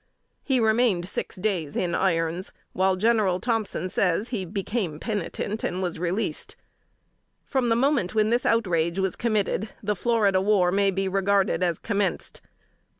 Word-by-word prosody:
He 265 -3 +1
remained 220 -5 +2
six - - -4
days 180 -7 -2
in 175 -2 -1
irons, 170 -1 0 0.2
when, 190 0 +2
General 210 -4 +2
Thompson 225 -5 -1
says, 185 +4 0
he 215 -7 -3
became 195 -3 -3
penitent, 210 +1 -3
and 180 - -2
was 180 -3 -2
released. 180 +5 -2 0.9
From 260 -3 0
the 230 - +3
moment 245 -6 +1
when 215 0 +3
this 240 +1 +2
outrage 170 -6 +1
was 190 -1 0
committed, 215 -2 0
the 210 +1 0
Florida 205 -3 +2
War 190 -3 +3
may 200 +1 +3
be 195 0 -1
regarded 195 -1 +1
as 175 -3 +1
commenced. 200 -4 -2
195 Hz, 150 wpm, -25 LUFS, 180-220 Hz, 0.9 s, the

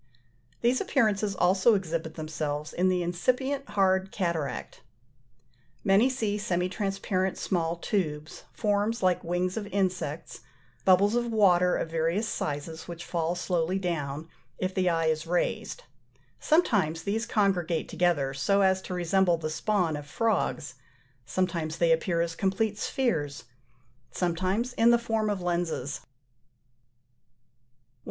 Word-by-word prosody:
These 245 +2 +2
appearances 210 -2 +1
also 190 +5 +4
exhibit 165 -4 -3
themselves 155 -1 -4
in 185 +2 +2
the 180 -1 +1
incipient 255 +11 -1
hard 190 -1 +2
cataract. 165 -9 -3 1.0
Many 205 +5 +4
see 220 -5 -1
semi 180 -3 0
transparent 190 0 -1
small 170 -2 -1
tubes, 155 -5 -3
forms 210 +1 0
like 185 -1 +2
wings 180 +3 -1
of 210 -2 -3
insects, 180 -6 -2 0.5
bubbles 195 +3 +5
of 240 -1 0
water 180 -5 +4
of 160 - -3
various 165 +7 0
sizes, 155 +1 -4
which 170 0 -7
fall 170 0 -1
slowly 175 0 0
down, 160 -5 -3 0.3
if 185 0 -2
the 185 -1 +2
eye 165 -1 +1
is 160 0 0
raised: 180 - -1 0.6
sometimes 195 - +2
these 220 +3 -1
congregate 190 -8 +1
together 170 -6 +1
so 165 +10 +2
as 190 -1 +3
to 185 - -5
resemble 180 0 +2
the 155 -1 -4
spawn 180 -2 0
of 145 -1 -7
frogs; 220 +6 -1 0.5
sometimes 170 +1 -1
they 170 -1 +3
appear 170 +1 +2
as 170 -1 -1
complete 205 +4 -1
spheres, 150 - -1 0.7
sometimes 185 - -1
in 230 -1 +4
the 235 - +6
form 225 -2 -1
of 200 -3 -2
lenses. 170 -6 -2
120. - - -26
180 Hz, 130 wpm, -28 LUFS, 165-205 Hz, 1.0 s, the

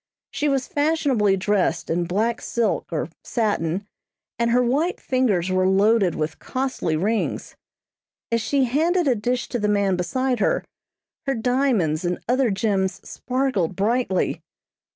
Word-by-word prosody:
She 295 - 0
was 270 -2 0
fashionably 285 -10 +1
dressed 200 0 0
in 175 +1 0
black 220 +6 0
silk 230 -4 -1
or 160 -1 -2
satin, 200 -5 -1 0.5
and 235 0 +2
her 250 +1 +3
white 290 +9 0
fingers 210 -9 +1
were 185 0 +2
loaded 195 -1 +3
with 155 +1 -3
costly 255 -11 -2
rings. 210 +8 -1 0.8
As 230 0 +2
she 275 +4 +1
handed 320 +7 +1
a 260 - +4
dish 245 +3 -1
to 240 - -2
the 210 - 0
man 200 -2 +2
beside 255 +7 -1
her, - - +1 0.6
her 270 - +1
diamonds 230 - +1
and 175 0 -1
other 250 +1 +2
gems 195 -2 -1
sparkled 250 -9 -1
brightly. 210 -1 0
225 Hz, 140 wpm, -23 LUFS, 190-255 Hz, 0.8 s, a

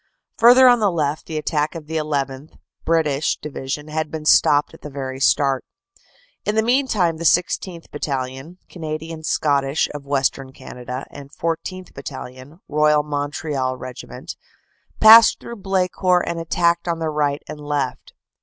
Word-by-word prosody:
Further 250 +3 +8
on 245 -1 +6
the 210 -2 +3
left 155 -4 -2
the 160 - -4
attack 150 +1 -1
of 160 -2 -7
the 160 +1 -4
llth. 145 -2 -3 0.3
(British) 155 -3 +1
Division 150 0 -5
had 155 0 -3
been 155 -1 -6
stopped 145 -1 +4
at - - -15
the 150 - -8
very 135 -1 -6
start. 135 -1 +2 0.8
"In 210 - -1
the 220 - +3
meantime 230 -9 +1
the 170 - -6
16th. 175 +1 0
Battalion, 135 +3 -4
Canadian 160 -1 -6
Scottish 140 -1 +1
of 145 -1 -8
Western 135 -1 -1
Canada, 125 +1 -8
and 140 -1 -11
14th. 170 +3 -4
Battalion, 130 +4 -9
Royal 150 0 +3
Montreal 145 -2 -3
Regiment, 125 -1 -9 0.6
passed 225 +1 +8
through 235 - -9
Blecourt 185 -2 +1
and 170 0 -3
attacked 170 +1 +1
on 170 -1 0
the 160 -1 -2
right 145 -1 -1
and 150 - -8
left. 145 -3 -4
150 Hz, 145 wpm, -21 LUFS, 140-170 Hz, 0.8 s, Further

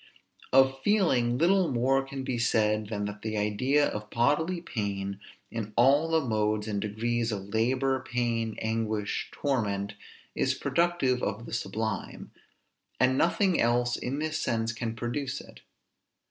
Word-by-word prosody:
Of 135 0 +4
feeling 135 - +2
little 180 +3 +3
more 130 +2 +2
can 135 0 -6
be 130 -3 -2
said 110 -2 +2
than 105 -1 -3
that 105 0 -6
the 110 -1 -3
idea 130 +8 +2
of 105 0 -5
bodily 150 +10 +1
pain, 100 - -3 0.3
in 110 -2 -5
all 140 +6 +4
the 160 -4 +1
modes 105 -1 0
and 100 -2 -2
degrees 115 +2 -1
of 100 -1 -5
labor, 130 +4 +1
pain, 115 -3 -1
anguish, 110 -2 -1
torment, 105 -8 -1 0.4
is - - +1
productive 170 -8 +1
of 110 +3 -3
the - - -9
sublime; 110 -1 -3 0.7
and 130 +1 +4
nothing 180 +4 +2
else 120 +1 +2
in 130 +3 -3
this 155 +1 -2
sense 115 -1 0
can 115 0 -4
produce 130 +4 -3
it. - - -13
120 Hz, 145 wpm, -28 LUFS, 110-135 Hz, 0.7 s, Of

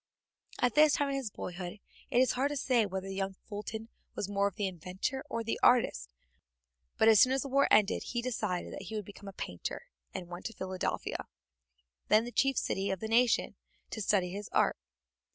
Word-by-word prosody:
At 245 -2 +2
this 300 -1 +6
time 285 -1 +1
in 275 - -1
his 265 -5 -3
boyhood 180 -1 -6 0.3
it - - 0
was 255 -1 +5
hard 265 +3 +1
to 290 - -3
say 245 -5 +2
whether 190 0 -4
the 195 - -4
young 195 0 -2
Fulton 215 +2 -7 0.3
was 195 - -2
more 200 0 +1
the 200 +1 -3
inventor 185 - -3
or 230 - -2
the 225 - -2
artist, 230 - +4 0.9
but 220 - +4
as 220 -2 +8
soon 255 - +6
as 265 -1 +1
the - - -5
war 275 +1 +4
ended 210 -2 +4
he 240 - -2
decided 220 -7 -2
that 195 - -7
he 220 - -5
would 210 -2 -3
become 205 0 -11
a - - -5
painter, 90 - -5 0.3
and 175 - -6
went 175 +1 -8
to 225 - -9
Philadelphia, 190 -2 -3 0.8
then 215 +2 +4
the 240 - -6
chief 270 +1 +2
city 195 +1 0
of 190 - -1
the 220 - -4
new 225 - +2
nation, 245 -1 +3 0.4
to 220 - -4
study 190 -3 +2
his 205 +2 -6
art. - - +2
210 Hz, 205 wpm, -31 LUFS, 190-245 Hz, 0.9 s, as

